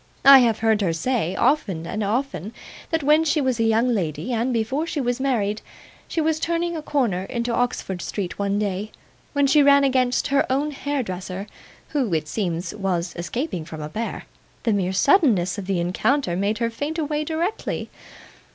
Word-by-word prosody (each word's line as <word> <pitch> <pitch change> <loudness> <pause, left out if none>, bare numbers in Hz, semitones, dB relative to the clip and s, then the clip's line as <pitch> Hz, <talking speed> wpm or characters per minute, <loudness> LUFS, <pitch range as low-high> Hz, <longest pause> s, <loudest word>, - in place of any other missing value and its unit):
I 275 0 +11
have 230 -3 +3
heard 220 -1 +3
her 175 -4 +1
say, 190 0 -1
often 190 - +1
and 210 +5 -3
often, 220 - -2 0.4
that 325 -2 0
when 300 +3 +5
she 310 0 +1
was 260 -4 0
a - - +3
young 225 +2 +3
lady, 190 - -2
and 235 +3 0
before 250 +7 -1
she 310 - -3
was 245 -1 -1
married, 220 -6 0 0.5
she - - -2
was 315 0 +1
turning 340 +1 -1
a 315 - -4
corner 235 -12 0
into 235 +1 -2
Oxford 230 -7 -1
Street 195 -3 -4
one 200 0 0
day, 205 0 -2 0.4
when 285 -1 +3
she 295 +2 +5
ran 280 0 +6
against 255 0 +1
her 275 -1 +2
own 285 +3 0
hairdresser, 200 -10 -4 0.4
who, 270 - -1
it 155 -1 -2
seems, 175 -2 -2
was 185 -4 -2
escaping 180 - -3
from 155 -1 -8
a 150 - -5
bear; 225 +8 -4 0.4
the 225 - +2
mere 190 -2 0
suddenness 200 - +3
of 190 - -7
the 195 -3 0
encounter 180 +5 0
made 200 +4 0
her 230 0 -1
faint 290 +7 -4
away 300 -1 -1
directly. 330 +6 -3
230 Hz, 180 wpm, -23 LUFS, 195-280 Hz, 0.5 s, I